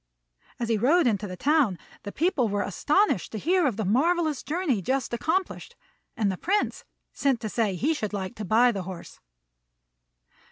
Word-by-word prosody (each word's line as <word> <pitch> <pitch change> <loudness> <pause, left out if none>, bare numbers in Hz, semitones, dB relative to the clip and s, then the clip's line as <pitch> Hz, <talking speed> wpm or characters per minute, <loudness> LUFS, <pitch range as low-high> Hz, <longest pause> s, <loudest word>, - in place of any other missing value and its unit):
As 235 -1 -2
he 225 -2 +1
rode 305 - +4
into 215 -3 0
the 185 -1 -7
town, 280 - +2 0.2
the 205 - -7
people 290 - +1
were 205 0 0
astonished 295 - +1
to - - -3
hear 345 - +2
of 230 -6 -2
the 220 - -2
marvellous 310 - +1
journey 305 - -1
just 260 +5 -1
accomplished, 325 +10 -2 0.4
and 205 -3 +1
the 185 - -5
Prince 405 - -1 0.3
sent 270 -4 +1
to 220 - -3
say 210 -4 0
he 285 - +1
should 215 -9 -3
like 190 -3 -4
to 215 - -5
buy 230 +5 +4
the 200 -4 -4
horse. 180 -1 -9
235 Hz, 175 wpm, -26 LUFS, 205-310 Hz, 0.4 s, rode